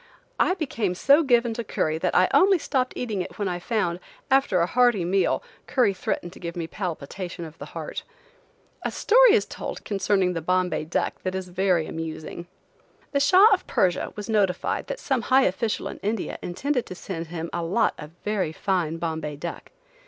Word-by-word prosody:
I 365 - +3
became 230 - -2
so 280 - +5
given 240 -5 +3
to 235 - -4
curry 160 -6 -1
that 180 +1 -1
I 185 - +5
only 385 0 +6
stopped 260 -5 -1
eating 220 -6 -2
it - - -7
when 205 - -1
I 175 -1 -2
found, 180 -4 -1 0.3
after 265 -9 +4
a 170 - +3
hearty 240 -3 +3
meal, 190 +2 +1 0.2
curry 245 -8 +3
threatened 175 -1 -3
to - - -13
give 170 -1 -6
me 170 -2 -3
palpitation 175 0 -5
of 160 0 -12
the - - -7
heart. - - -5 0.8
A - - -1
story - - +5
is 440 - +3
told - - -7
concerning 195 -2 +1
the 165 - -3
Bombay 180 -1 0
duck 160 - -2
that 185 0 -3
is 190 -1 -4
very 180 -2 +1
amusing. 165 +1 -6 0.6
The 280 - +2
Shah 365 +10 +7
of 375 - -1
Persia 180 -2 +1
was 210 - -6
notified 205 -5 0
that - - -4
some 265 -4 0
high 265 +3 +4
official 215 +2 0
in - - -7
India 210 0 -3
intended 250 +8 -2
to 185 - -7
send 170 -3 -6
him 165 0 -5
a 170 - -1
lot 180 +8 +1
of 150 - -8 0.2
very 205 -6 0
fine 165 -2 -1
Bombay 160 -3 -3
duck. 170 +4 -7
190 Hz, 190 wpm, -25 LUFS, 170-240 Hz, 0.8 s, Shah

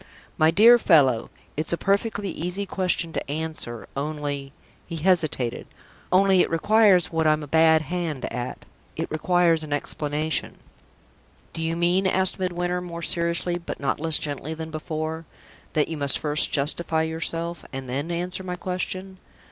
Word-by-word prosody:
"My 155 - +4
dear 230 +7 +7
fellow, 135 - +4 0.3
it's 155 +1 -1
a 170 - 0
perfectly 200 0 0
easy 180 +5 -4
question 180 -3 -1
to - - -4
answer. 155 -7 -3
Only" 145 -1 -4 0.4
he 170 - -6
hesitated 155 -8 0 0.4
"only 190 0 +5
it - - +1
requires 195 +1 +4
what 160 -1 +1
I'm 155 0 +2
a - - -8
bad 160 +1 +4
hand 170 -5 -3
at: 125 +1 -5 0.3
it - - -4
requires 165 0 +2
an 150 - -8
explanation." 150 +2 -2 1.0
"Do 165 - -5
you 165 0 -1
mean," 175 +3 +2
asked 190 0 +2
Midwinter, 180 -1 -1
more 170 -1 -7
seriously, 170 +1 +1
but 170 - -7
not 140 - -1
less 160 0 +4
gently 145 +1 -4
than 160 0 -7
before, 155 +1 -4 0.5
"that 150 - +2
you 160 - -5
must 140 -2 +3
first 150 0 0
justify 160 +3 +1
yourself, 165 0 -2
and 135 -1 -6
then 140 +6 -3
answer 175 +2 -3
my 180 -1 -4
question?" 185 +1 -4
165 Hz, 155 wpm, -24 LUFS, 155-180 Hz, 1.0 s, dear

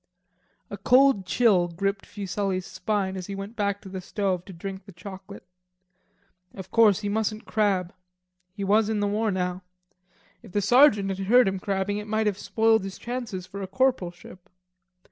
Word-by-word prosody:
A 200 - -5
cold 250 -2 +4
chill 190 -4 +3
gripped 195 +3 -3
Fuselli's 195 -2 -3
spine 195 0 -2
as 185 -1 -6
he 200 - -5
went 200 +3 -7
back 200 -2 -1
to - - -12
the 190 0 -6
stove 185 -1 -2
to 195 - -10
drink 190 +2 -7
the 200 - -12
chocolate. 190 +2 -11 1.1
Of 190 -1 -9
course 215 -4 +5
he 205 - -3
mustn't 215 +1 -2
crab. 195 -5 0 0.6
He 200 +1 -6
was 210 +2 +3
in 220 -1 0
the 205 - +1
war 215 +2 0
now. 180 -1 -2 0.8
If 220 -7 -15
the 205 - +1
sergeant 215 -3 +5
had 195 0 -4
heard 245 +1 +6
him 195 0 -1
crabbing, 200 +1 -1
it 210 - -8
might 220 +1 0
have 205 -2 0
spoiled 225 -1 +2
his 195 -1 -6
chances 235 -7 -5
for 200 +2 -8
a 190 - -4
corporalship. 185 -7 -2
200 Hz, 175 wpm, -26 LUFS, 190-215 Hz, 1.1 s, heard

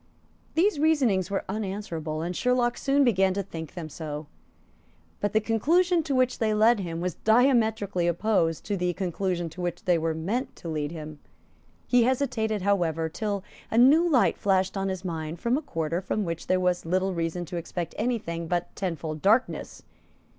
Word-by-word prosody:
These 340 -1 +3
reasonings 265 - +2
were 200 - -2
unanswerable; 190 -6 -4
and 175 +1 -3
Sherlock 245 +1 +1
soon 280 +2 +2
began 190 -6 +3
to 200 - -1
think 165 -4 -8
them 170 -3 -5
so; 150 0 -6 0.9
but 205 - 0
the 220 - +3
conclusion 330 - +2
to 290 -3 -2
which 255 0 +2
they 215 -1 +1
led 220 +1 +4
him 170 -3 -4
was 180 -1 -1
diametrically 220 -6 +3
opposed 170 -2 +1
to 205 - -2
the 180 -1 0
conclusion 180 -1 -2
to 170 +3 -9
which 175 +4 -4
they 175 -3 +3
were 160 0 -1
meant 205 +12 -2
to - - -10
lead 150 -2 -2
him. 155 -2 -8 0.7
He 245 - +4
hesitated, 230 -5 0
however, 165 -5 +1
till 200 +2 -3 0.3
a 220 - -1
new 300 +8 +6
light 265 -7 +3
flashed 190 -1 +1
on 195 0 -1
his 190 0 -5
mind 160 -1 -4
from 235 +5 +1
a 295 - -1
quarter 165 - -2
from 205 +2 -2
which 165 -1 -4
there 185 - +2
was 180 -1 +1
little 185 +3 0
reason 170 +1 -2
to 175 +1 -5
expect 170 0 -4
any 240 +2 +1
thing 170 -5 -5
but 175 +1 -2
tenfold 160 -5 -4
darkness. 220 +6 +1
190 Hz, 180 wpm, -27 LUFS, 170-230 Hz, 0.9 s, new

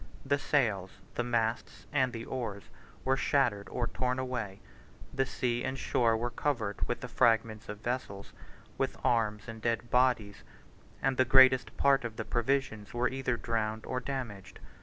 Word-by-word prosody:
67 - - -14
The 140 0 +3
sails, 110 -10 +1 0.2
the 120 - -1
masts, 115 -1 -1
and 130 -3 +2
the 115 -1 -6
oars, 115 -6 -4 0.4
were 130 0 +3
shattered 125 -7 +1
or 120 - -1
torn 125 +1 -1
away; 120 -7 -3 0.5
the 135 -1 +1
sea 120 -2 -1
and 130 0 -2
shore 115 -3 +2
were 120 +2 -2
covered 115 -9 -2
with - - -2
the - - -5
fragments 110 -2 +2
of 105 0 -6
vessels, 115 -5 -4 0.5
with - - -1
arms 105 -3 +1
and 115 -1 -8
dead 115 +1 -1
bodies; 125 -5 +2 0.6
and 135 -1 +1
the 130 - +6
greatest 130 0 +6
part 140 -2 +4
of 115 -2 -5
the 110 - -4
provisions 120 -3 -1
were 120 +1 +2
either 130 -2 -1
drowned 110 -1 -2
or 125 - -2
damaged. 125 -8 -6
120 Hz, 165 wpm, -31 LUFS, 110-130 Hz, 0.6 s, the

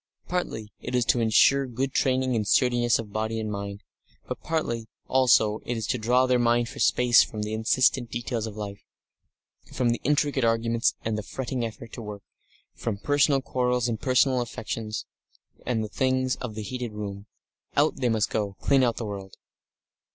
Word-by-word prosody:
Partly, 110 -12 -3
it 125 - -4
is 125 -2 +2
to 120 - +3
ensure 125 +5 +4
good 130 +2 -2
training 130 -1 +1
and 105 -2 -1
sturdiness 120 -1 +3
of 105 -3 -7
body 110 +1 -1
and 110 -1 -3
mind, 100 0 -5 0.4
but - - -5
partly, 120 -9 -2 0.2
also, 110 -4 +3
it 120 - -3
is 110 - -3
to 125 - -1
draw 125 +4 +3
their 125 -1 +2
minds 120 0 +2
for - - -11
a - - -3
space 125 -1 +5
from 105 -2 -5
the 105 +1 -4
insistent 120 +2 +2
details 115 -1 -3
of 105 - -8
life, 100 -1 -6 0.9
from 125 -2 +1
the 120 - -2
intricate 145 -2 +1
arguments 115 0 +2
and 110 -1 -1
the - - -2
fretting 125 +2 -4
effort 115 0 -7
to 120 - -6
work, 105 -2 -8 0.5
from 110 -3 -3
personal 145 +3 +2
quarrels 125 -1 0
and 115 -2 -3
personal 130 0 +3
affections, 110 -2 -4 0.6
and 115 -3 0
the - - -3
things 130 +2 0
of 115 -4 -6
the 110 - -4
heated 125 0 -5
room. 100 -1 -6 0.5
Out 150 +2 +3
they 125 -3 +1
must 110 -2 +1
go, 105 -3 -1
clean 135 -1 +3
out 120 -2 +2
of - - -28
the 115 - -3
world. 100 -2 -7
120 Hz, 190 wpm, -26 LUFS, 110-130 Hz, 0.9 s, space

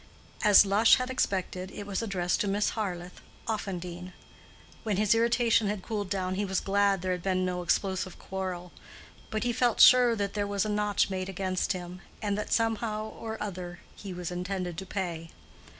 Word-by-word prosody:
As 210 -1 +8
Lush 205 +3 +6
had 255 0 -3
expected, 185 -6 -1
it 205 - -8
was 200 0 -2
addressed 185 -5 0
to 205 - 0
Miss 205 +1 +1
Harleth, 180 -5 -5 0.3
Offendene. 180 -4 -4 0.7
When 210 -4 -1
his 210 +1 +4
irritation 230 -1 +3
had 200 -2 -3
cooled 205 -3 -3
down 185 -2 -1
he 200 +2 -1
was 190 -2 0
glad 200 -1 +1
there 185 - 0
had 180 -1 -2
been 185 0 0
no 180 -1 -2
explosive 185 +1 -1
quarrel; 185 -2 -5 0.6
but 215 -1 -2
he 245 -1 0
felt 240 -1 +1
sure 250 -2 +8
that 200 -2 -2
there 205 -1 -1
was 200 0 0
a - - -2
notch 210 -1 +1
made 185 0 -3
against 190 0 -1
him, 180 0 -7 0.2
and 205 -2 -1
that 210 +1 -4
somehow 220 -1 0
or 225 -1 -6
other 180 -3 -5 0.2
he 200 - -8
was 180 -1 -5
intended 180 0 -3
to 190 - -8
pay. 170 -4 -4
195 Hz, 180 wpm, -29 LUFS, 185-210 Hz, 0.7 s, As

